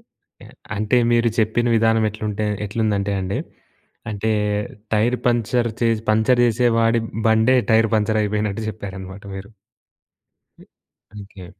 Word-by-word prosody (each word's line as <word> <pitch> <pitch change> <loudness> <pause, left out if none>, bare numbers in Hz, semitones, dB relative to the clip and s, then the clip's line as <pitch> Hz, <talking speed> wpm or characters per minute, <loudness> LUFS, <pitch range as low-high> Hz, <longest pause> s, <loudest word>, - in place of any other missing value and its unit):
ఒకే. - - -22 0.3
అంటే 110 +4 +1 0.2
మీరు 120 0 +3
చెప్పిన 110 +2 +1
విధానం 115 0 +3
ఎట్లుంటే 105 0 -3 0.2
ఎట్లుందంటే 105 -2 -1
అండి 95 +1 -3 0.7
అంటే 110 +2 -2 0.6
టైర్ 115 +4 +2
పంక్చర్ 120 0 +1
చేసి 115 -2 +1
పంక్చర్ 110 +3 +3
చేసే 120 +1 +2
వాడి 115 +1 +3 0.3
బండే 110 +4 +4
టైర్ 110 0 +4
పంక్చర్ 110 +1 +1
అయిపోయినట్టు 105 +1 -2
చెప్పారన్నమాట 100 -2 -8
మీరు. 95 +1 -8 1.1
హ్మ్. - - -18 0.5
ఓకే. 95 -2 -12
110 Hz, 120 wpm, -21 LUFS, 105-115 Hz, 1.1 s, బండే